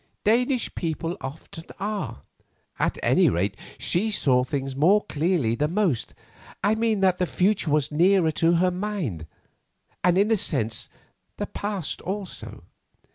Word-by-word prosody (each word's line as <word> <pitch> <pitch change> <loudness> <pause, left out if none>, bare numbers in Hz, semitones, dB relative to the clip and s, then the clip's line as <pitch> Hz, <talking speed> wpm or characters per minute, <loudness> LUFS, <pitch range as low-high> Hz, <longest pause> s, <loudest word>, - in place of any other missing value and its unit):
Danish 245 +3 +1
people 165 0 -3
often 155 +4 -8
are. 200 - -4 0.6
At - - 0
any - - +4
rate, 90 +5 0 0.2
she 205 +6 0
saw 130 -11 +3
things 135 0 -3
more 185 +9 +4
clearly 155 -7 0
than 150 +7 -1
most. 180 - 0 0.5
I 210 - +3
mean 220 -2 +1
that 185 -2 +3
the 180 - +1
future 185 -2 +1
was 150 -1 +1
nearer 175 +1 +4
to 165 +2 +2
her 180 +2 +3
mind; 180 - -3 0.8
and 180 0 +4
in 205 +3 +3
a 220 - +4
sense, 115 - -1 0.5
the - - -2
past 200 -6 -4
also." 195 0 -6
175 Hz, 140 wpm, -25 LUFS, 145-205 Hz, 0.8 s, any